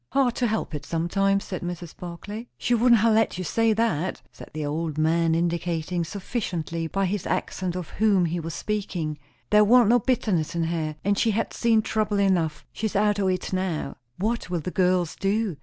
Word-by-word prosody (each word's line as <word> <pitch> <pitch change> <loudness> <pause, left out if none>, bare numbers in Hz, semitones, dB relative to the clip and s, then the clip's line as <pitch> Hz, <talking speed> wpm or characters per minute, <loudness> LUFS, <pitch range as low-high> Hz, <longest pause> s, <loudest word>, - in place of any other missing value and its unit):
"Hard 265 -3 +3
to 245 - +2
help 220 -5 -2
it, 145 -1 -4
sometimes," 195 +6 +1
said 185 - -5
Mrs. 175 -2 -6
Barclay. 205 +6 -7
"She 245 - 0
wouldn't 235 -1 +5
ha' 230 - +4
let 220 -3 +2
you 185 - -3
say 225 +5 +2
that," 190 -6 -1
said - - -12
the 155 -1 -4
old 155 +1 -2
man, 160 +1 +2
indicating 170 0 -1
sufficiently 170 -4 -3
by 195 +4 0
his 190 0 -2
accent 185 0 -2
of 180 -3 -5
whom 200 -4 +3
he 170 +1 -1
was 165 -1 -5
speaking. 180 -8 -3 0.3
"There 210 0 +7
warn't 235 +1 +6
no 245 +1 +5
bitterness 185 -9 0
in 170 - +1
her; 160 -2 -2
and 200 0 +2
she 230 - +3
had 220 +1 -1
seen 225 -2 +2
trouble 215 -2 0
enough! 180 -6 +1
She's 220 -1 -3
out 205 0 +2
o' 195 - +1
it 185 0 -1
now." 185 -6 -2 0.2
"What 220 0 -1
will 175 -2 -1
the 180 - -4
girls 180 -2 +1
do? 200 -3 0
185 Hz, 195 wpm, -25 LUFS, 165-210 Hz, 0.3 s, There